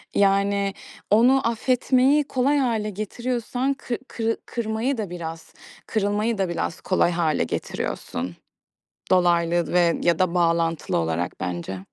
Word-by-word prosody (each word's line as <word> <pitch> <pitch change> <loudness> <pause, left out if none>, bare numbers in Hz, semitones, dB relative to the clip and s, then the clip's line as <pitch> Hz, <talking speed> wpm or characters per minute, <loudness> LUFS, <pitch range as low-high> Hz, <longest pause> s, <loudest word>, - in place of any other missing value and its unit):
Yani, 200 0 +2 0.4
onu 245 +4 +4
affetmeyi 255 +4 +3
kolay 270 +3 +1
hâle 230 -6 0
getiriyorsan 240 +5 -2
kı 250 -3 -4
kırı 225 -1 -1
kırmayı 235 +3 -2
da 205 -5 -3
biraz, 165 -2 -7 0.3
kırılmayı 210 +1 0
da 190 -2 0
biraz 170 -1 -3
kolay 185 -2 +2
hâle 165 -3 +1
getiriyorsun. 85 +1 -4 0.8
Dolaylı 175 -1 +3
ve 170 -2 +3
ya 170 -2 +2
da 185 -2 +2
bağlantılı 165 -2 +1
olarak 80 +1 -2
bence. 90 +1 -4
200 Hz, 120 wpm, -24 LUFS, 170-235 Hz, 0.8 s, onu